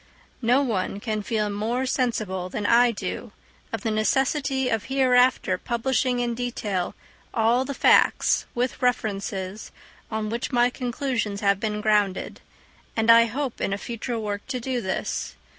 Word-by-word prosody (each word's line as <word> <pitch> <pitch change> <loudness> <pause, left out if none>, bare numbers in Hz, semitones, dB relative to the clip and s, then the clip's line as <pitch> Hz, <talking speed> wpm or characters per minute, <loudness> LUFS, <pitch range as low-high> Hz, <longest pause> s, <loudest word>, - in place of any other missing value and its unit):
No 250 +4 +3
one 200 -5 -2
can 215 -1 -2
feel 210 0 -1
more 225 +5 -1
sensible 215 -8 -1
than 205 +2 -4
I 240 +3 +5
do 210 +1 -5 0.4
of 225 - -3
the 225 - -1
necessity 265 +4 +1
of 225 -3 -1
hereafter 255 -7 +3
publishing 245 +2 0
in 240 -1 -1
detail 220 -6 -3 0.4
all 235 +3 +3
the 280 - -4
facts, - - +4
with 245 +1 -1
references, 205 -5 -2 0.4
on 220 -1 -2
which 235 +4 -3
my 245 -1 +3
conclusions 245 -5 -2
have 200 -1 +2
been 210 0 -2
grounded; 210 -3 +1 0.6
and 225 +1 +5
I 230 0 +8
hope 255 +2 -4
in 195 - 0
a - - -1
future 235 +2 -4
work 205 -2 -3
to 260 -2 -3
do 250 0 -2
this. 190 -2 -3
230 Hz, 150 wpm, -25 LUFS, 210-250 Hz, 0.6 s, I